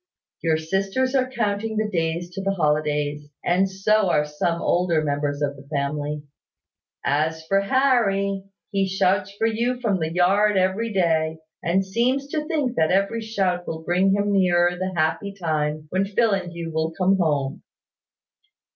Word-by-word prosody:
Your 160 Hz, -2 st, +2 dB
sisters 195 Hz, +10 st, -1 dB
are 260 Hz, -1 st, +2 dB
counting 220 Hz, -3 st, -2 dB
the 215 Hz, 0 st, +1 dB
days 170 Hz, -2 st, -2 dB
to 195 Hz, +2 st, -5 dB
the 195 Hz, 0 st, -1 dB
holidays; 150 Hz, -2 st, 0 dB, 0.2 s
and 185 Hz, +2 st, +2 dB
so 195 Hz, +1 st, +2 dB
are 150 Hz, -3 st, +2 dB
some 160 Hz, +3 st, -1 dB
older 170 Hz, -3 st, +1 dB
members 145 Hz, 0 st, -1 dB
of 140 Hz, -1 st, -1 dB
the 140 Hz, 0 st, -14 dB
family. 145 Hz, +1 st, -2 dB, 0.8 s
As 160 Hz, +3 st, 0 dB
for 195 Hz, +4 st, +2 dB
Harry, 200 Hz, -5 st, +1 dB, 0.3 s
he 195 Hz, -1 st, +1 dB
shouts 190 Hz, +1 st, +1 dB
for 225 Hz, -, +1 dB
you 235 Hz, +3 st, 0 dB
from 210 Hz, -6 st, 0 dB
the 160 Hz, 0 st, -2 dB
yard 195 Hz, +4 st, +3 dB
every 190 Hz, +5 st, +1 dB
day, 160 Hz, -4 st, +1 dB, 0.2 s
and 190 Hz, +3 st, +1 dB
seems 245 Hz, +7 st, 0 dB
to 300 Hz, 0 st, -2 dB
think 285 Hz, -7 st, -1 dB
that 160 Hz, 0 st, +3 dB
every 200 Hz, +5 st, +1 dB
shout 190 Hz, -5 st, -1 dB
will 160 Hz, 0 st, -5 dB
bring 180 Hz, +4 st, +2 dB
nearer 185 Hz, -3 st, +3 dB
the 185 Hz, +1 st, -3 dB
happy 175 Hz, +5 st, -1 dB
time 155 Hz, -2 st, -1 dB
when 190 Hz, +1 st, +1 dB
Phil 220 Hz, +3 st, +2 dB
and 185 Hz, -3 st, -1 dB
you 170 Hz, -1 st, -6 dB
will 160 Hz, 0 st, 0 dB
come 190 Hz, +1 st, +3 dB
home. 145 Hz, -5 st, 0 dB
185 Hz, 160 wpm, -23 LUFS, 160-205 Hz, 0.8 s, yard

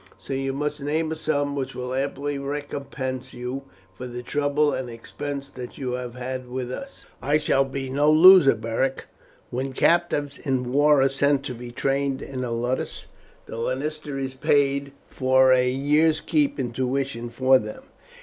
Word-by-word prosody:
So -, -, -7 dB
you 135 Hz, 0 st, -1 dB
must 150 Hz, +2 st, -3 dB
name 155 Hz, +3 st, -1 dB
a -, -, -1 dB
sum 145 Hz, -2 st, -1 dB
which 135 Hz, -1 st, -4 dB
will 125 Hz, 0 st, -4 dB
amply 140 Hz, +1 st, -2 dB
recompense 140 Hz, -2 st, -5 dB
you 125 Hz, +3 st, -5 dB, 0.3 s
for 125 Hz, +7 st, -7 dB
the 125 Hz, 0 st, -7 dB
trouble 145 Hz, +2 st, +1 dB
and 130 Hz, -2 st, -3 dB
expense 140 Hz, +4 st, -6 dB
that 125 Hz, -1 st, -8 dB
you 130 Hz, -2 st, -3 dB
have 125 Hz, -1 st, -4 dB
had 130 Hz, 0 st, -5 dB
with 125 Hz, 0 st, -4 dB
us." 275 Hz, -, -8 dB, 0.2 s
"I 145 Hz, +4 st, +2 dB
shall 150 Hz, -3 st, +2 dB
be 135 Hz, 0 st, -5 dB
no 145 Hz, +3 st, +3 dB
loser, 165 Hz, -4 st, +8 dB
Beric. 115 Hz, +4 st, -2 dB, 0.5 s
When 130 Hz, +2 st, -3 dB
captives 145 Hz, -3 st, +1 dB
in 130 Hz, -3 st, -1 dB
war 145 Hz, -1 st, +5 dB
are -, -, +5 dB
sent 140 Hz, 0 st, +1 dB
to 130 Hz, -, -4 dB
be 120 Hz, 0 st, -8 dB
trained 135 Hz, +1 st, -1 dB
in 130 Hz, -2 st, -5 dB
a 125 Hz, -, -3 dB
ludus 120 Hz, +2 st, -2 dB, 0.4 s
the -, -, -8 dB
lanista 145 Hz, +4 st, -3 dB
is 135 Hz, -1 st, -3 dB
paid 140 Hz, +1 st, +1 dB
for 130 Hz, 0 st, +4 dB
a 125 Hz, 0 st, +3 dB
year's 150 Hz, +4 st, +3 dB
keep 150 Hz, -4 st, +1 dB
and 125 Hz, -4 st, -3 dB
tuition 130 Hz, -1 st, -2 dB
for 130 Hz, +2 st, +4 dB
them. 105 Hz, 0 st, -8 dB
135 Hz, 170 wpm, -24 LUFS, 130-145 Hz, 0.5 s, loser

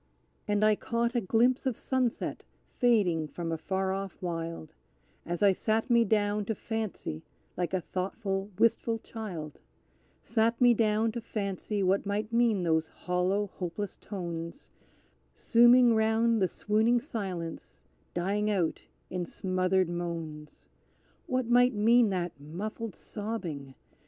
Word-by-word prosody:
And 205 Hz, 0 st, +2 dB
I 215 Hz, 0 st, +5 dB
caught 235 Hz, +2 st, -1 dB
a 240 Hz, -, +1 dB
glimpse 240 Hz, +6 st, +2 dB
of 250 Hz, -, -1 dB
sunset 255 Hz, -3 st, -1 dB, 0.3 s
fading 195 Hz, -10 st, +2 dB
from 165 Hz, +2 st, -5 dB
a 165 Hz, -, -1 dB
far 190 Hz, +1 st, -1 dB
off 195 Hz, -1 st, -5 dB
wild, 165 Hz, -2 st, -5 dB, 0.5 s
As 175 Hz, +3 st, -2 dB
I 200 Hz, -, +7 dB
sat 220 Hz, +5 st, 0 dB
me 235 Hz, -1 st, +5 dB
down 210 Hz, 0 st, +1 dB
to 220 Hz, -, -2 dB
fancy, 215 Hz, -, -4 dB, 0.3 s
like 175 Hz, -, -2 dB
a 185 Hz, -1 st, 0 dB
thoughtful, 195 Hz, +2 st, -3 dB
wistful 230 Hz, 0 st, +2 dB
child 185 Hz, -10 st, -7 dB, 0.6 s
Sat 230 Hz, +1 st, +1 dB
me 245 Hz, -1 st, +6 dB
down 220 Hz, 0 st, +2 dB
to 235 Hz, +1 st, -5 dB
fancy 200 Hz, -1 st, -3 dB
what 195 Hz, +2 st, +1 dB
might 210 Hz, +2 st, -2 dB
mean 230 Hz, -5 st, +3 dB
those 160 Hz, -1 st, +2 dB
hollow, 180 Hz, +3 st, -1 dB
hopeless 185 Hz, +3 st, -4 dB
tones, 170 Hz, -, -6 dB, 0.6 s
Sooming 240 Hz, +1 st, +6 dB
round 225 Hz, 0 st, +2 dB
the 185 Hz, -, +4 dB
swooning 220 Hz, +6 st, +2 dB
silence, 180 Hz, -, -6 dB, 0.3 s
dying 200 Hz, +4 st, 0 dB
out 185 Hz, -6 st, 0 dB, 0.3 s
in 180 Hz, -1 st, -2 dB
smothered 185 Hz, +1 st, 0 dB
moans! 165 Hz, -3 st, -6 dB, 0.6 s
What 255 Hz, -1 st, 0 dB
might 245 Hz, +1 st, +4 dB
mean 230 Hz, +2 st, +5 dB
that 175 Hz, -5 st, -3 dB
muffled 205 Hz, +9 st, -6 dB
sobbing? 175 Hz, -11 st, -5 dB
205 Hz, 130 wpm, -29 LUFS, 175-225 Hz, 0.6 s, I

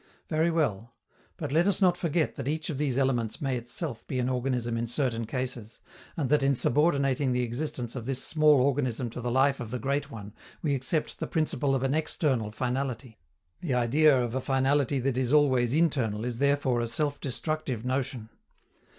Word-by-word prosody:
Very 160 Hz, +1 st, +2 dB
well, 120 Hz, -9 st, -1 dB, 0.4 s
but -, -, -4 dB
let 165 Hz, +5 st, +3 dB
us 200 Hz, -, +2 dB
not 180 Hz, -3 st, +4 dB
forget 170 Hz, -2 st, 0 dB
that 135 Hz, -2 st, -6 dB
each 155 Hz, +2 st, -2 dB
of 140 Hz, -, -5 dB
these 140 Hz, -4 st, 0 dB
elements 125 Hz, -5 st, 0 dB
may 135 Hz, -3 st, -1 dB
itself 120 Hz, +2 st, -5 dB
be 130 Hz, -, -3 dB
an 125 Hz, 0 st, 0 dB
organism 125 Hz, -2 st, -1 dB
in 115 Hz, 0 st, -2 dB
certain 120 Hz, -2 st, -1 dB
cases, 125 Hz, -3 st, -5 dB, 0.4 s
and 145 Hz, -5 st, 0 dB
that 150 Hz, -1 st, +4 dB
in 135 Hz, 0 st, +3 dB
subordinating 140 Hz, -1 st, +2 dB
the 125 Hz, 0 st, +1 dB
existence 120 Hz, 0 st, -4 dB
of 120 Hz, -2 st, -6 dB
this 135 Hz, -1 st, -2 dB
small 155 Hz, -3 st, +4 dB
organism 130 Hz, -3 st, 0 dB
to 125 Hz, -, -6 dB
the 120 Hz, -, -2 dB
life 135 Hz, +2 st, +2 dB
of 120 Hz, -, -5 dB
the 125 Hz, -, -3 dB
great 140 Hz, +4 st, -1 dB
one 105 Hz, -5 st, -9 dB, 0.3 s
we 150 Hz, -3 st, +1 dB
accept 140 Hz, +4 st, -2 dB
the -, -, -3 dB
principle 150 Hz, -3 st, 0 dB
of 130 Hz, -, -1 dB
an 135 Hz, 0 st, +1 dB
external 145 Hz, -7 st, 0 dB
finality. 125 Hz, -1 st, -3 dB, 0.4 s
The 145 Hz, -8 st, -1 dB
idea 135 Hz, +4 st, +4 dB
of 120 Hz, -2 st, -2 dB
a 130 Hz, -, -1 dB
finality 135 Hz, +1 st, +1 dB
that 130 Hz, 0 st, 0 dB
is 130 Hz, -1 st, 0 dB
always 130 Hz, -5 st, +4 dB
internal 130 Hz, -9 st, +1 dB
is 120 Hz, -1 st, -4 dB
therefore 140 Hz, -3 st, +2 dB
a 115 Hz, -, -1 dB
self 145 Hz, +4 st, -2 dB
destructive 135 Hz, -3 st, -2 dB
notion. 130 Hz, -3 st, -2 dB
130 Hz, 190 wpm, -28 LUFS, 120-145 Hz, 0.4 s, not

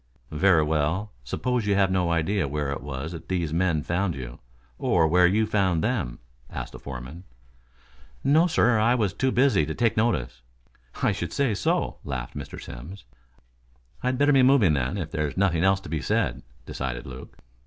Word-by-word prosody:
"Very 80 Hz, +1 st, +4 dB
well. 80 Hz, +7 st, 0 dB
Suppose 125 Hz, -4 st, -2 dB
you 100 Hz, -, +3 dB
have 95 Hz, -1 st, +3 dB
no 90 Hz, -2 st, +1 dB
idea 85 Hz, +1 st, 0 dB
where 75 Hz, 0 st, -2 dB
it 70 Hz, -, -4 dB
was 70 Hz, +3 st, -5 dB
that 85 Hz, -2 st, -9 dB
these 85 Hz, -4 st, -1 dB
men 85 Hz, -3 st, +1 dB
found 90 Hz, +2 st, -1 dB
you, -, -, -8 dB, 0.4 s
or 80 Hz, -, +3 dB
where 90 Hz, +2 st, +5 dB
you 105 Hz, +4 st, +2 dB
found 95 Hz, -6 st, +1 dB
them?" 105 Hz, -, -1 dB, 0.3 s
asked -, -, -6 dB
the -, -, -10 dB
foreman. 65 Hz, +6 st, -8 dB, 1.0 s
"No, 160 Hz, +5 st, +4 dB
sir. 125 Hz, -9 st, +3 dB
I 115 Hz, +3 st, +3 dB
was 105 Hz, -6 st, 0 dB
too 130 Hz, +5 st, 0 dB
busy 130 Hz, +2 st, +3 dB
to -, -, -4 dB
take 115 Hz, -3 st, +1 dB
notice." 110 Hz, -, 0 dB, 0.6 s
"I -, -, +4 dB
should -, -, -4 dB
say 135 Hz, -6 st, +1 dB
so," 100 Hz, -, 0 dB
laughed 65 Hz, -3 st, -5 dB
Mr. 70 Hz, -1 st, -7 dB
Simms. 85 Hz, +12 st, -9 dB, 1.0 s
"I'd 125 Hz, 0 st, 0 dB
better 145 Hz, +2 st, +4 dB
be 135 Hz, -, +6 dB
moving 125 Hz, -, +5 dB
then, 70 Hz, +7 st, -1 dB
if 80 Hz, -5 st, -4 dB
there's 75 Hz, 0 st, -2 dB
nothing 90 Hz, -4 st, +2 dB
else 95 Hz, 0 st, +3 dB
to 95 Hz, -, -10 dB
be 80 Hz, -1 st, -2 dB
said," -, -, 0 dB, 0.2 s
decided 65 Hz, -2 st, -4 dB
Luke. 65 Hz, 0 st, -10 dB
90 Hz, 180 wpm, -25 LUFS, 75-110 Hz, 1.0 s, be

